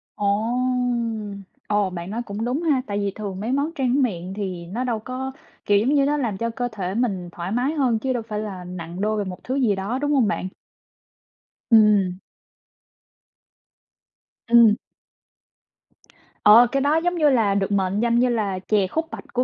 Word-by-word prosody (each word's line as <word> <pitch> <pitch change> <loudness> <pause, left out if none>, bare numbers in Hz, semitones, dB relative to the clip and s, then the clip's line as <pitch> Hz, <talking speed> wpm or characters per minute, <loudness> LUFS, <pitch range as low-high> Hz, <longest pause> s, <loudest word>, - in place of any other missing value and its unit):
Ồ! 205 - -3 1.4
Ồ, 205 -2 +1
bạn 175 0 -6
nói 230 +3 -3
cũng 210 +2 -4
đúng 260 +7 -1
ha. 290 -6 +2
Tại 205 - -2
vì 200 -1 -1
thường 200 -3 -5
mấy 225 +4 -3
món 280 +4 0
trang 265 +1 +1
miệng 185 -5 -3
thì 185 -4 -5
nó 225 +9 -4
đâu 235 -3 -1
có, 255 +3 -5 0.3
kiểu 205 -1 +4
giống 255 +8 +1
như, 275 -1 +4
nó 295 +1 +1
làm 230 -9 -2
cho 230 +2 -2
cơ 245 +1 -3
thể 190 -3 -4
mình 195 -7 -1
thoải 175 +2 -6
mái 250 +6 0
hơn, 255 -7 +1
chứ 260 +1 -1
đâu 240 -2 -3
phải 210 -1 -3
là 195 -4 -6
nặng 180 0 -7
đô 215 +1 0
về 205 - 0
một 185 -2 -8
thứ 260 - -3
gì 240 -7 +2
đó, 205 +7 -3
đúng 290 0 0
hông 260 -7 +3
bạn? 195 - -2 1.2
Ừm. 205 -5 +5 2.3
Ừm. 230 -2 +6 1.7
Ờ, 230 +4 +8
cái 275 -1 +1
đó 290 +2 +2
giống 355 0 0
như 305 -3 +4
là 220 -7 +2
được 200 0 0
mệnh 195 0 +1
danh 235 0 +2
như 250 +1 +3
là 205 -5 -1
chè 200 0 +1
khúc 320 - -2
bạch - - -7
của 250 0 +2
215 Hz, 190 wpm, -23 LUFS, 195-255 Hz, 2.3 s, Ờ